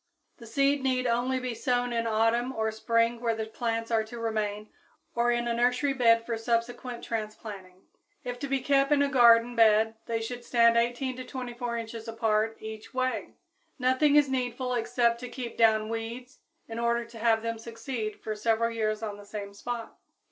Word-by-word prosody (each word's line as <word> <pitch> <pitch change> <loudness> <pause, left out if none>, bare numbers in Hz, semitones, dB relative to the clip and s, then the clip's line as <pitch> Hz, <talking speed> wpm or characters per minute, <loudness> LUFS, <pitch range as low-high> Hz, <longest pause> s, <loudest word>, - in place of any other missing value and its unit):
The 235 - -12
seed 275 +4 +2
need 255 -1 0
only 245 +2 +1
be 255 -1 -3
sown 245 0 0
in 230 0 0
autumn 225 +3 +2
or 220 0 0
spring 230 +1 +1
where 230 -2 +1
the 220 0 -3
plants 230 +1 -3
are 225 -1 +3
to 235 +2 -9
remain 215 -2 -2 0.4
or 235 0 +2
in 240 0 0
a 235 - +1
nursery 250 +4 +2
bed 230 -3 +4
for 230 -1 -3
subsequent 235 +1 -2
transplanting. 210 -4 -6 0.4
If 245 0 -5
to 280 - -3
be 270 -1 0
kept 275 +1 +2
in 285 -1 +5
a - - +2
garden 240 -2 +6
bed 220 -1 +5
they 230 -1 -1
should 240 +2 -5
stand 230 -1 +4
18 240 +2 0
to 255 - -5
24 245 -2 -5
inches 230 0 -6
apart 225 -1 0
each 220 +2 -9
way. 255 -5 -2 0.4
Nothing 260 +3 +3
is 295 -1 +6
needful 250 -1 -2
except 235 0 +1
to 250 0 -7
keep 245 -3 -6
down 220 -2 +4
weeds 230 +4 -6 0.3
in 225 0 -5
order 235 0 +1
to 230 0 -12
have 225 -1 +2
them 230 0 -3
succeed 230 -1 -5
for 215 - -3
several 225 +2 +1
years 215 -1 -1
on 205 -2 -4
the 205 - -12
same 200 -1 -6
spot. 235 +3 -6
235 Hz, 185 wpm, -28 LUFS, 225-245 Hz, 0.4 s, garden